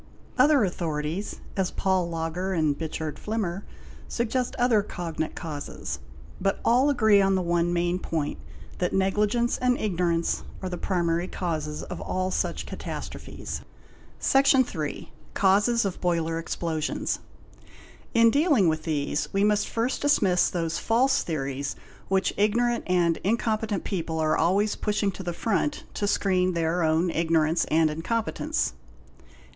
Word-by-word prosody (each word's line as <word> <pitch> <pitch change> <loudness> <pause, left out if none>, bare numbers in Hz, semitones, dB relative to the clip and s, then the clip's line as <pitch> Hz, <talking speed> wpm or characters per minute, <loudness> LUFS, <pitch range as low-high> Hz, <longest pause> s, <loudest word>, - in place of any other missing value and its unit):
Other 290 -5 +5
authorities, 165 0 -3
as 190 -2 +1
Pawl 190 -3 0
Lagar 165 +3 -2
and 155 -4 +2
Richard 160 -1 -4
Flimmer, 205 -3 -3 0.4
suggest 240 +1 -1
other 240 -4 +3
cognate 165 -5 -4
causes; 145 - -5 0.4
but 195 +1 +1
all 255 +5 +4
agree 220 -7 +5
on 195 0 +3
the 185 - +1
one 175 0 +1
main 175 +1 0
point, 160 -5 -3 0.4
that 180 - 0
negligence 210 +5 +1
and 250 0 +2
ignorance 170 -4 0 0.2
are 185 - -4
the 180 - -4
primary 175 -2 0
causes 155 -5 -3
of - - -7
all 185 0 -2
such - - -1
catastrophes. - - -6 0.6
Section 270 -1 +4
iiii—Causes 200 - 0
of 190 -2 -3
Boiler 165 -2 0
explosions. 165 -2 -2 1.0
In 230 0 +6
dealing 285 - +4
with 155 -1 0
these 150 -2 -1
we 195 +1 +1
must 210 0 +2
first 235 +3 -1
dismiss 200 -11 +3
those 165 -2 -2
false 255 +4 +2
theories 140 -3 -3 0.3
which 190 0 +1
ignorant 235 +3 +2
and 175 -2 +2
incompetent 215 -1 0
people 165 -4 -3
are 155 -1 +2
always 200 +5 +2
pushing 210 -1 0
to 190 - -8
the 175 -2 -3
front 225 - -1
to 205 - -1
screen 185 -2 +2
their 170 +1 0
own 165 +2 +2
ignorance 165 0 +2
and 160 0 +3
incompetence. 230 - -1
185 Hz, 135 wpm, -26 LUFS, 165-215 Hz, 1.0 s, In